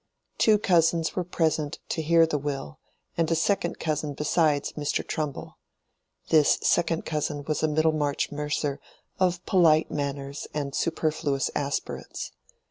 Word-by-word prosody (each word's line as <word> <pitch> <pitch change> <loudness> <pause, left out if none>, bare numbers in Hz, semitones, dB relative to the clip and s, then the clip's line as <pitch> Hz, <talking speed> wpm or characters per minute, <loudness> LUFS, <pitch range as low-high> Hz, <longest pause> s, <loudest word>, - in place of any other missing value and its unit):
Two 215 -1 +5
cousins 165 -4 +2
were 180 - 0
present 160 -3 -1
to 160 - -1
hear 165 +1 +5
the 150 -2 -1
will, 135 - -5 0.4
and 165 -1 +1
a 165 - +2
second 170 +1 0
cousin 150 -2 -2
besides 150 -1 +1
Mr. 145 -1 -2
Trumbull. 150 -3 -4 0.7
This 155 -2 +5
second 165 -1 +2
cousin 150 -2 -2
was 150 0 -2
a 155 - +3
Middlemarch 155 -2 +1
mercer 150 -1 -2 0.4
of 180 -1 +1
polite 165 -4 +4
manners 140 -1 -4
and 140 -2 -2
superfluous 155 -4 0
aspirates. 140 -1 -4
155 Hz, 130 wpm, -26 LUFS, 145-165 Hz, 0.7 s, Two